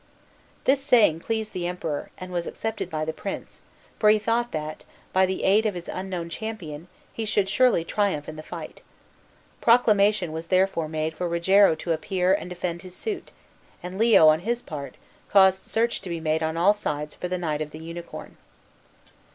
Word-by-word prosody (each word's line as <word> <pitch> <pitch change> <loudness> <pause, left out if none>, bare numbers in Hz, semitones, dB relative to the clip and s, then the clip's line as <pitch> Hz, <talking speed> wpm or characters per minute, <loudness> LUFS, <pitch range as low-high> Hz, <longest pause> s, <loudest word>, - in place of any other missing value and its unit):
This 270 0 +2
saying 230 - +4
pleased 220 +3 -3
the 175 -1 -2
Emperor, 165 -4 -4
and 185 0 -8
was 175 -1 -2
accepted 220 -5 -4
by 155 -2 -2
the 160 - -3
prince, 195 +4 -7 0.4
for 210 - +5
he 215 - +6
thought 230 +3 0
that, 155 0 -5 0.3
by 190 0 +4
the 190 - -3
aid 215 +3 +4
of 205 - -2
his 175 -1 -7
unknown 185 -2 -4
champion, 170 -5 -6 0.3
he 225 - -4
should 205 -2 +1
surely 235 -3 +3
triumph 195 -7 0
in 155 - -7
the 155 - -7
fight. - - -9 0.8
Proclamation 210 -6 +4
was 160 +1 -6
therefore 185 -3 +2
made 155 0 -2
for 175 +2 -3
Rogero 180 +2 +4
to 165 +2 -4
appear 180 +3 +1
and 195 -2 -2
defend 175 -1 -4
his 185 0 -10
suit; 415 -5 -5 0.5
and 180 +2 -6
Leo, 225 -8 +6
on 155 0 +4
his 235 +6 -2
part, 145 -3 -7 0.3
caused 190 -1 +4
search 235 +1 0
to 185 - -8
be 170 -1 -3
made 160 0 0
on 160 +1 -1
all 185 +5 +5
sides 150 -7 -4
for 180 - -5
the 180 +1 -2
knight 155 -4 -2
of 155 - -3
the 155 - -10
Unicorn. 170 +2 -9
180 Hz, 185 wpm, -25 LUFS, 160-210 Hz, 0.8 s, he